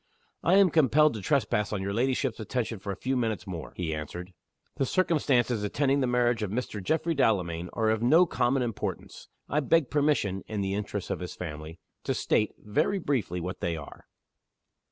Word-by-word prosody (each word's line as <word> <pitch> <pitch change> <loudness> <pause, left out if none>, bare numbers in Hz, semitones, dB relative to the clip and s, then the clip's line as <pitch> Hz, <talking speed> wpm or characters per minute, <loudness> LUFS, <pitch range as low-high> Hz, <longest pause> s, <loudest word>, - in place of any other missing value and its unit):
"I 175 - +4
am 195 -3 +6
compelled 150 0 +4
to 110 - -5
trespass 105 -4 +1
on 100 -3 -2
your 100 +1 -2
ladyship's 130 +1 0
attention 115 0 -3
for 100 +1 -5
a - - -4
few 130 +7 -2
minutes 110 -6 -1
more," 85 -5 -6
he 85 -3 -2
answered. 90 +4 -6 0.4
"The 135 - +1
circumstances 135 - +2
attending 140 +6 +1
the 130 - +1
marriage 120 -1 +2
of 105 - -1
Mr. 105 -2 -3
Geoffrey 160 - +1
Delamayn 90 - +1
are 110 -1 +1
of 110 0 0
no 160 +9 +6
common 130 -4 +1
importance. 115 -3 -5 0.2
I 150 - +1
beg 150 0 +2
permission 140 -10 +1
(in 105 -2 -3
the 95 0 -1
interests 105 -1 -3
of - - -2
his 90 - -6
family) 80 -1 -7 0.3
to - - 0
state, 105 - +1
very 105 - 0
briefly, 125 - -1
what 90 +2 -5
they 85 -1 -2
are." 75 - -11
110 Hz, 185 wpm, -28 LUFS, 95-135 Hz, 0.4 s, am